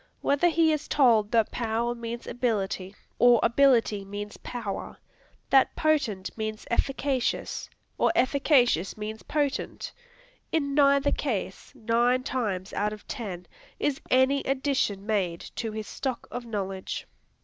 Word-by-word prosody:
Whether 285 Hz, +5 st, +3 dB
he 320 Hz, -1 st, +3 dB
is 305 Hz, 0 st, -3 dB
told 230 Hz, -7 st, +4 dB
that 225 Hz, -2 st, +2 dB
"power" 235 Hz, 0 st, -1 dB
means 235 Hz, 0 st, -6 dB
"ability," 200 Hz, -5 st, -2 dB, 0.2 s
or 245 Hz, -1 st, +6 dB
"ability" 235 Hz, -4 st, +3 dB
means 205 Hz, +1 st, -6 dB
"power," 220 Hz, -6 st, -5 dB, 0.5 s
that 270 Hz, -1 st, +5 dB
"potent" 265 Hz, -12 st, 0 dB
means 215 Hz, -1 st, -4 dB
"efficacious," 270 Hz, +1 st, -1 dB, 0.3 s
or -, -, +4 dB
"efficacious" 255 Hz, -, +3 dB
means 215 Hz, +1 st, -5 dB
"potent," 290 Hz, -2 st, -2 dB, 0.6 s
in 285 Hz, -3 st, 0 dB
neither 280 Hz, 0 st, +4 dB
case, 215 Hz, -8 st, -3 dB
nine 240 Hz, +3 st, +2 dB
times 205 Hz, -9 st, -2 dB
out 210 Hz, +1 st, 0 dB
of 210 Hz, -, -12 dB
ten, 195 Hz, -9 st, -5 dB, 0.3 s
is 280 Hz, -2 st, -1 dB
any 260 Hz, +2 st, +4 dB
addition 265 Hz, -7 st, 0 dB
made 190 Hz, -6 st, 0 dB, 0.2 s
to 225 Hz, -2 st, -2 dB
his 215 Hz, 0 st, -5 dB
stock 260 Hz, +3 st, -4 dB
of 245 Hz, -1 st, -6 dB
knowledge. 195 Hz, -3 st, -4 dB
235 Hz, 125 wpm, -27 LUFS, 210-270 Hz, 0.6 s, or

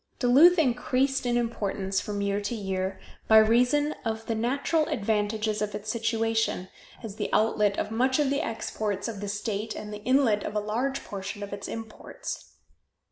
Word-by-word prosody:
Duluth 285 Hz, +9 st, +6 dB
increased 265 Hz, -2 st, +1 dB
in 240 Hz, 0 st, +2 dB
importance 200 Hz, -5 st, -1 dB
from 205 Hz, -1 st, -3 dB
year 200 Hz, 0 st, 0 dB
to 205 Hz, +4 st, -3 dB
year 190 Hz, -2 st, -3 dB, 0.3 s
by 220 Hz, -, +7 dB
reason 245 Hz, +7 st, +4 dB
of 225 Hz, -1 st, -3 dB
the 225 Hz, -, -1 dB
natural 275 Hz, +7 st, 0 dB
advantages 215 Hz, 0 st, 0 dB
of 210 Hz, 0 st, -2 dB
its 215 Hz, +1 st, -3 dB
situation, 225 Hz, -4 st, 0 dB, 0.3 s
as 215 Hz, -2 st, -7 dB
the -, -, -2 dB
outlet 210 Hz, -2 st, +2 dB
of 210 Hz, -, -2 dB
much 255 Hz, +3 st, +2 dB
of 290 Hz, -3 st, +2 dB
the 280 Hz, -, +1 dB
exports 215 Hz, -2 st, -3 dB
of 220 Hz, -4 st, -5 dB
the 205 Hz, -, -4 dB
state 210 Hz, +1 st, -3 dB
and 210 Hz, 0 st, -7 dB
the 210 Hz, -, -7 dB
inlet 250 Hz, -4 st, +3 dB
of 210 Hz, -, -5 dB
a -, -, +3 dB
large 240 Hz, +6 st, -2 dB
portion 205 Hz, +1 st, -6 dB
of 200 Hz, -, -6 dB
its 200 Hz, 0 st, -6 dB
imports. 225 Hz, -, -7 dB
220 Hz, 175 wpm, -27 LUFS, 205-245 Hz, 0.3 s, by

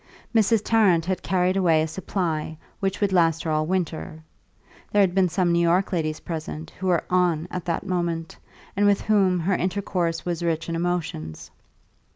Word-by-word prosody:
Mrs. 220 Hz, -1 st, +3 dB
Tarrant 195 Hz, -8 st, +3 dB
had 185 Hz, 0 st, -2 dB
carried 185 Hz, 0 st, +1 dB
away 165 Hz, -5 st, +3 dB
a -, -, -2 dB
supply 160 Hz, -3 st, -3 dB, 0.2 s
which 195 Hz, -1 st, -1 dB
would 200 Hz, -2 st, +1 dB
last 165 Hz, -3 st, +3 dB
her 160 Hz, -, -2 dB
all 155 Hz, 0 st, 0 dB
winter; 165 Hz, -3 st, -3 dB, 0.7 s
there 205 Hz, -, +4 dB
had 180 Hz, -2 st, +1 dB
been 190 Hz, -1 st, +3 dB
some 175 Hz, +1 st, +1 dB
New 170 Hz, 0 st, +3 dB
York 175 Hz, +3 st, +2 dB
ladies 155 Hz, -3 st, -1 dB
present 160 Hz, -1 st, -6 dB
who 190 Hz, -, -5 dB
were 175 Hz, -2 st, +2 dB
"on" 175 Hz, -3 st, +2 dB
at 180 Hz, -, -5 dB
that 170 Hz, +2 st, -2 dB
moment, 170 Hz, -3 st, -2 dB, 0.4 s
and 205 Hz, +1 st, +3 dB
with 200 Hz, -1 st, +3 dB
whom 195 Hz, -4 st, +2 dB
her 190 Hz, +4 st, +1 dB
intercourse 180 Hz, -3 st, -1 dB
was 175 Hz, -2 st, -2 dB
rich 165 Hz, -1 st, -1 dB
in 165 Hz, -, -2 dB
emotions. 165 Hz, -, -3 dB
175 Hz, 180 wpm, -24 LUFS, 165-190 Hz, 0.7 s, there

